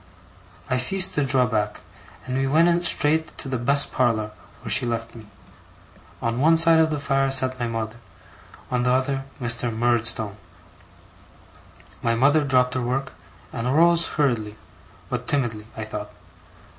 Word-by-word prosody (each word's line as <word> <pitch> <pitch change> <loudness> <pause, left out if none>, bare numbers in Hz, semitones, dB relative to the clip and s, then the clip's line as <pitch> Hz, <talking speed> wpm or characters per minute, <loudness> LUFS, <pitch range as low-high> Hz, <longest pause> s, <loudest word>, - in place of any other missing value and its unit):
I 130 - 0
ceased 185 +9 +3
to 145 - 0
draw 130 -2 +2
back, 105 -3 -2 0.4
and 130 - -4
we 135 0 0
went 170 +4 +3
straight 160 +1 +1
to - - -4
the 130 -2 -3
best 140 +4 +1
parlour, 115 -4 0 0.3
where - - -5
she - - +6
left 115 -1 -3
me. 110 -2 -13 1.0
On 115 +1 -1
one 165 +2 +4
side 165 0 +5
of 160 0 +3
the 150 - -2
fire, 135 -1 0
sat 130 -1 +2
my 120 - -2
mother; 115 0 -4 0.7
on 125 -1 0
the 125 - 0
other, 135 +1 -1
Mr. 120 -1 -2
Murdstone. 110 -2 0 1.6
My 115 0 0
mother 145 +5 +3
dropped 125 -2 +2
her 130 - -2
work, 130 +2 -3 0.4
and 115 -1 -3
arose 170 +5 +3
hurriedly, 120 -8 -1 0.5
but - - -5
timidly 115 -6 -2
I 110 - -4
thought. 105 -1 -7
130 Hz, 155 wpm, -23 LUFS, 115-140 Hz, 1.6 s, she